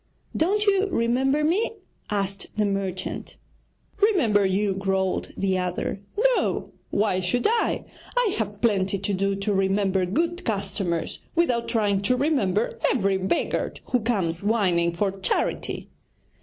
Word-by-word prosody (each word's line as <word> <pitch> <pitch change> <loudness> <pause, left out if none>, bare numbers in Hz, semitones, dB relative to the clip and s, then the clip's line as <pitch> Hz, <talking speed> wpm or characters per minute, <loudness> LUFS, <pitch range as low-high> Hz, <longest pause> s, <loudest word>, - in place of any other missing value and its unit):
'Don't 405 +6 +2
you 400 -1 +3
remember 265 +3 +1
me?' 375 +10 +1 0.4
asked 200 -1 -1
the 210 - +3
merchant. 195 -2 -3 0.6
'Remember 285 - +4
you?' 195 +1 +1
growled 190 -1 -1
the 190 -1 +1
other; 180 +2 -2 0.2
'no, - - +1 0.2
why 205 -3 +1
should 190 +7 0
I? 460 0 +1 0.3
I 475 -6 +3
have 205 -1 -3
plenty 200 -4 +2
to 200 +1 -2
do 195 +1 +1
to 200 +1 -1
remember 195 -1 +1
good 335 - -1
customers 195 -5 -2 0.2
without 245 -9 +2
trying 210 -4 +1
to 250 +6 +2
remember 240 - +1
every 195 -6 +1
beggar 190 +1 -1 0.2
who 250 - +3
comes 195 -8 0
whining 190 -6 +2
for 195 +3 0
charity.' 195 0 -1
205 Hz, 130 wpm, -25 LUFS, 190-250 Hz, 0.6 s, Remember